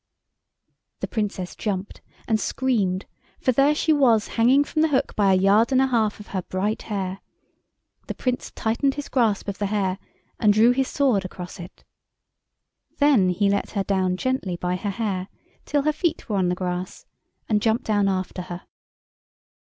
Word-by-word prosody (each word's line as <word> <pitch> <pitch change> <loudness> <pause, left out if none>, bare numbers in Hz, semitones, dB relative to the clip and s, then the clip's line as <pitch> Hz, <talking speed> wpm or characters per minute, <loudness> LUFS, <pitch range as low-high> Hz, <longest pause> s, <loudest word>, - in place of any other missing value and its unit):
The - - -2
Princess 200 -5 -3
jumped, 200 -2 -4 0.3
and 220 -2 +2
screamed, 205 -6 0 0.3
for 255 - +2
there 275 +4 +3
she 315 +1 +2
was 240 -7 +3
hanging 250 +5 +4
from 310 +2 -1
the 320 - +4
hook 280 -4 0
by 200 -2 +3
a - - +5
yard 200 +6 +4
and 260 - +4
a 265 - +4
half 225 -5 0
of 210 - -12
her 190 - -2
bright 195 +5 -2
hair; 195 -2 -4 0.9
the - - -4
Prince 250 -1 -2
tightened 250 +5 0
his 290 - -6
grasp 225 -7 +1
of 200 - -4
the 205 - 0
hair 195 -2 -1 0.4
and 210 -3 +4
drew 225 +3 +5
his 265 +1 +1
sword 255 -9 +1
across 180 0 -8
it. 175 +1 -11 1.1
Then 275 -11 +4
he 200 +3 +1
let 200 0 0
her 200 -2 0
down 185 -2 0
gently 255 -5 -1
by 180 +1 -1
her 200 +3 -3
hair 195 -3 -2 0.4
till 290 -1 0
her 305 +1 +2
feet 325 +1 -2
were 210 -4 -1
on 185 -2 +2
the 180 - 0
grass, 180 0 -4 0.4
and 210 -2 +1
jumped 225 +3 +1
down 205 -2 +2
after 185 -1 -2
her. 175 -1 -8
210 Hz, 175 wpm, -24 LUFS, 190-255 Hz, 1.1 s, a